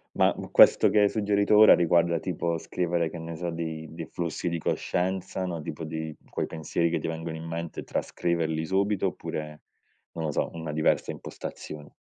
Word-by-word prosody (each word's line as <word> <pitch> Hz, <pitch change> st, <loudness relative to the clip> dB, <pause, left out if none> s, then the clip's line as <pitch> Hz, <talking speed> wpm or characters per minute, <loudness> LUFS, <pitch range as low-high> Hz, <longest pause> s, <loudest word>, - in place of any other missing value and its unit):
Ma, -, -, +4 dB
mhmm, -, -, -7 dB
questo -, -, +7 dB
che 105 Hz, -, +3 dB
hai 100 Hz, -1 st, +5 dB
suggerito 105 Hz, 0 st, +2 dB
ora 110 Hz, 0 st, +9 dB
riguarda 85 Hz, 0 st, +3 dB
tipo 85 Hz, -1 st, -2 dB
scrivere, 85 Hz, 0 st, -1 dB
che 85 Hz, -, -8 dB
ne 80 Hz, 0 st, -6 dB
so, 85 Hz, +1 st, -3 dB
dei 80 Hz, -1 st, -4 dB
dei 80 Hz, 0 st, -6 dB
flussi 85 Hz, +1 st, -4 dB
di 85 Hz, -, -1 dB
coscienza, 95 Hz, +3 st, -1 dB
no, 85 Hz, -3 st, -4 dB
tipo 75 Hz, +2 st, -6 dB
dei 80 Hz, -1 st, -5 dB
quei -, -, -2 dB
pensieri 80 Hz, +1 st, -1 dB
che 85 Hz, -, 0 dB
ti -, -, -4 dB
vengono 80 Hz, 0 st, -4 dB
in 80 Hz, -, -7 dB
mente, 85 Hz, 0 st, -5 dB
trascriverli 80 Hz, -2 st, -1 dB
subito, 100 Hz, +2 st, +1 dB
oppure, 75 Hz, -4 st, -5 dB, 0.5 s
non 80 Hz, -1 st, -3 dB
lo 75 Hz, -, -1 dB
so, -, -, 0 dB
una 80 Hz, -2 st, -5 dB
diversa 80 Hz, +1 st, +1 dB
impostazione. 75 Hz, -1 st, -8 dB
85 Hz, 185 wpm, -27 LUFS, 80-90 Hz, 0.5 s, ora